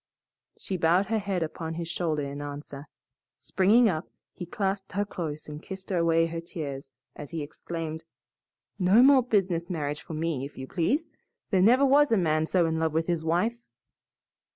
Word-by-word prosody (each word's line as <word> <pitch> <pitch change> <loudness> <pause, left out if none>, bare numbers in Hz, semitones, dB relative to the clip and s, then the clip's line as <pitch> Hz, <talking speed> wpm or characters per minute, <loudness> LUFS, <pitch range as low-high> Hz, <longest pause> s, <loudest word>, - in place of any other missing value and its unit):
She 190 - -4
bowed 175 +4 +3
her 220 -1 +1
head 195 -4 -1
upon 160 0 -5
his 170 0 -4
shoulder 160 -3 -1
in 140 +1 -5
answer. 145 0 -8 0.5
Springing 215 +6 +3
up, 160 -5 -2 0.2
he 175 - -7
clasped 195 -1 -3
her 205 +2 0
close 160 -6 -5
and 150 0 -8
kissed 190 +1 -8
away 165 -2 +3
her 165 0 -4
tears 140 -5 -7 0.2
as 145 - -8
he 165 -3 -4
exclaimed, 160 +1 -6 0.8
"No 195 +6 +6
more 270 -1 +7
business 185 -8 0
marriage 150 -4 -3
for 160 - -8
me, 155 -4 -2
if 140 - -8
you 130 - -5
please. 255 - -1 0.4
There 190 -3 +3
never 250 +8 +5
was 285 +1 +5
a 225 - +4
man 155 -3 +1
so 180 -1 +2
in 160 0 -1
love 160 -1 0
with 160 +1 +1
his 170 -2 -1
wife." 180 +9 0
170 Hz, 175 wpm, -27 LUFS, 155-195 Hz, 0.8 s, more